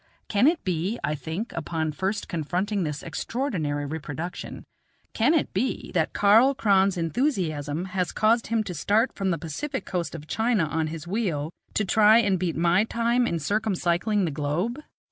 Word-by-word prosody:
Can 210 +5 +3
it 325 +1 +2
be 185 +4 -1
I 150 - 0
think, 160 - -5
upon 160 -1 -2
first 190 +7 -2
confronting 185 +5 -1
this 150 -4 -3
extraordinary 165 - -2
reproduction 160 +3 -6 0.5
can 255 +9 +3
it 315 - 0
be, 240 +8 -2
that 160 -4 +1
Karl 225 +7 +5
Kron's 195 -4 +3
enthusiasm 165 - -1
has 185 -1 -2
caused 225 +1 +2
him 225 -1 +1
to 185 - -5
start 215 - +1
from 195 -1 -1
the 170 - +1
Pacific 260 - -4
coast 175 -3 -3
of 150 -2 -8
China 220 0 +1
on 160 +1 -1
his 160 0 -6
wheel 170 -6 -2 0.2
to 215 - +1
try 215 +3 +6
and 200 -5 +2
beat 175 -2 -1
my 175 +4 +3
time 235 +2 +1
in 170 - -1
circumcycling 195 +2 0
the 165 - -2
globe? 155 - -2
185 Hz, 165 wpm, -26 LUFS, 160-220 Hz, 0.5 s, try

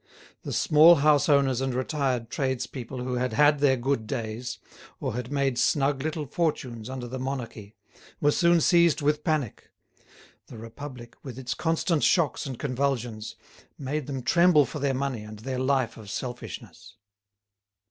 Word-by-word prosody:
The - - -6
small 160 +3 +6
houseowners 140 -3 +3
and 135 -2 -1
retired 130 -3 -1
tradespeople 130 -1 -3
who 125 0 -2
had 125 -2 -1
had 145 +3 +4
their 135 -2 +3
good 120 -3 -1
days, 115 +2 -4 0.4
or - - -3
had 125 +2 -5
made 135 -3 0
snug 140 0 +2
little 155 +1 -3
fortunes 130 -7 -2
under 130 -2 -5
the 130 +2 -6
monarchy, 120 -6 -5 0.4
were 145 - +3
soon 170 +1 +3
seized 170 -3 +4
with 150 +1 +1
panic; 155 - -2 0.8
the - - -11
Republic, 120 +1 -9
with 130 -3 -9
its 130 -2 -3
constant 165 -1 0
shocks 160 -4 +2
and 130 -3 -6
convulsions, 125 -5 -2 0.4
made 145 0 -3
them 135 -3 -4
tremble 170 0 +5
for 150 - -7
their 140 -1 0
money 135 -4 -2
and 105 0 -9
their 130 +4 -4
life 130 -3 0
of 110 -3 -11
selfishness. 125 +3 -7
130 Hz, 150 wpm, -26 LUFS, 120-145 Hz, 0.8 s, small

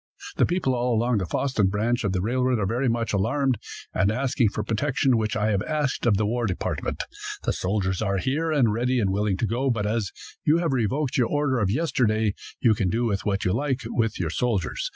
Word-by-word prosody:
The - - +4
people 175 -7 0
all 120 -1 +1
along 115 0 +2
the 95 - -3
Fosston 115 -6 +1
branch 115 +5 0
of 100 -2 0
railroad 125 +5 +1
are 105 - 0
very 120 +6 0
much 115 -1 -1
alarmed, 125 +6 +1 0.3
and 95 +2 +2
asking 130 -1 +1
for 105 - -3
protection, 130 +4 +1
which 110 -2 0
I 110 0 +1
have 100 -2 +1
asked 150 -2 -1
of 105 -4 +4
the 105 - +1
war 120 +2 0
department. 90 - -2 0.4
The - - 0
soldiers 95 0 -1
are 100 -2 0
here, 150 - 0
and 125 -8 +3
ready 125 +3 +1
and 100 -4 +1
willing 100 -1 0
to 115 - 0
go, 120 +6 0
but 115 -4 0
as 105 -2 -1 0.3
you 155 +2 +4
have 170 -4 0
revoked 130 +3 0
your 125 -3 +3
order 145 -3 +1
of 100 -4 +1
yesterday, 110 -6 +1 0.3
you 115 -3 +4
can 100 -3 0
do 115 +1 0
what 100 -1 -1
you 90 - +2
like 135 +2 -1
with 115 -2 -1
your 85 -3 -1
soldiers. 105 -6 -1
115 Hz, 215 wpm, -25 LUFS, 105-130 Hz, 0.4 s, The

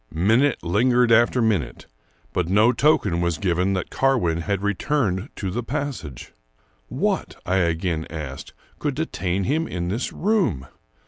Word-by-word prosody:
Minute 110 - +2
lingered 120 +7 +3
after 120 +2 +4
minute, 85 - -1 0.5
but 90 -2 -1
no 105 +5 +5
token 105 - +2
was 85 -3 0
given 90 +2 0
that 95 - -3
Carwin 110 -12 +1
had 100 +2 -2
returned 105 - 0
to 95 -3 -4
the 120 - -2
passage. 125 - -5 0.5
What, - - -1
I 90 +2 +1
again 85 -2 0
asked, 75 -4 -7 0.3
could 145 -3 -2
detain 100 - -2
him 155 - 0
in 85 -1 -3
this 115 +7 -2
room? 190 - 0
100 Hz, 140 wpm, -23 LUFS, 85-125 Hz, 0.5 s, no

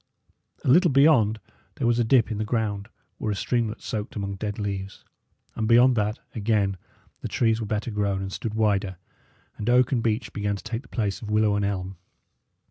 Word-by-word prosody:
A - - -2
little 175 +7 +6
beyond 135 -6 +4 0.4
there - - -2
was 120 0 +2
a - - +4
dip 115 0 +3
in 105 - -3
the - - 0
ground, 105 -2 -2 0.3
where 110 - -1
a - - -1
streamlet 115 +1 -1
soaked 105 -1 -4
among 100 -1 -3
dead 105 +1 -4
leaves; 100 -2 -5 0.5
and 110 - -2
beyond 120 +2 +6
that, 105 0 0 0.2
again, 105 -3 0 0.4
the - - -3
trees 115 -1 +1
were 110 - -3
better 105 +3 -2
grown 100 -2 0
and 95 0 -5
stood 110 -2 -4
wider, 100 -4 +1 0.6
and 105 - -2
oak 125 0 +4
and 125 -4 +1
beech 115 +1 -1
began 105 -1 -1
to 100 - -9
take 115 +1 -4
the 130 - -20
place 105 -4 -2
of 110 - -7
willow 105 -1 +3
and 105 0 0
elm. 95 -2 -3
110 Hz, 200 wpm, -25 LUFS, 100-115 Hz, 0.6 s, little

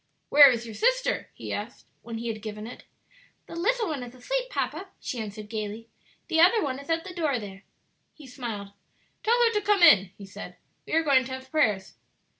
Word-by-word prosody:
"Where 285 -1 +9
is 235 -2 -1
your 225 - -8
sister?" - - 0
he - - -6
asked - - -6 0.2
when 230 -1 -7
he 235 +1 -5
had 220 -1 -5
given 210 -1 -6
it. 240 - -10 0.6
"The - - -10
little 450 +6 +1
one 300 -5 -3
is 245 0 -9
asleep, - - -3
papa," 295 - -3
she 250 - -5
answered 210 -1 -6
gayly; 215 +1 -5 0.4
"the 320 - +1
other 370 +7 +6
one 270 -2 -2
is 280 - -13
at 330 0 +1
the 370 - -8
door 310 -7 0
there." 200 -3 -9 0.5
He 305 - -14
smiled. 230 -6 -6 0.5
"Tell 465 +2 +3
her 460 -1 +3
to 420 - +1
come 410 -2 +2
in," 195 - +7
he 200 - -10
said; 195 - -10 0.3
"we - - -6
are 325 +1 +3
going 275 -4 +4
to 260 - -6
have 260 0 -8
prayers." 215 -12 +1
260 Hz, 210 wpm, -27 LUFS, 220-335 Hz, 0.6 s, Where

